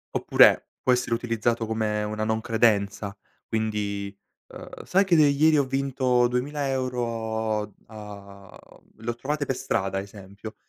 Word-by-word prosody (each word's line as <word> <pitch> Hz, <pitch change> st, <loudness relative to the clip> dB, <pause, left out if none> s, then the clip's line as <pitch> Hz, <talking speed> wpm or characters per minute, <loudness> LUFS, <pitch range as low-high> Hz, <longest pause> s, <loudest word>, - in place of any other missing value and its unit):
Oppure -, -, +5 dB
può 125 Hz, -, +3 dB
essere 125 Hz, -1 st, 0 dB
utilizzato 115 Hz, -1 st, -1 dB
come 110 Hz, -1 st, -1 dB
una 110 Hz, +1 st, -3 dB
non 110 Hz, 0 st, 0 dB
credenza, 105 Hz, -3 st, +1 dB, 0.3 s
quindi, 105 Hz, -2 st, -3 dB, 0.3 s
uhm: -, -, -10 dB
"Sai 195 Hz, +2 st, +3 dB
che 185 Hz, -3 st, +2 dB
de 155 Hz, -, +7 dB
ieri 150 Hz, +2 st, +4 dB
ho 140 Hz, -, +3 dB
vinto 130 Hz, -2 st, +1 dB
2000€ 120 Hz, -6 st, -2 dB
a 100 Hz, -2 st, -11 dB, 0.4 s
l'ho 115 Hz, +1 st, -4 dB
trovate 145 Hz, +4 st, -2 dB
per 135 Hz, -, -2 dB
strada", 95 Hz, -4 st, -1 dB
esempio, 100 Hz, +2 st, -10 dB
110 Hz, 130 wpm, -25 LUFS, 105-130 Hz, 0.4 s, de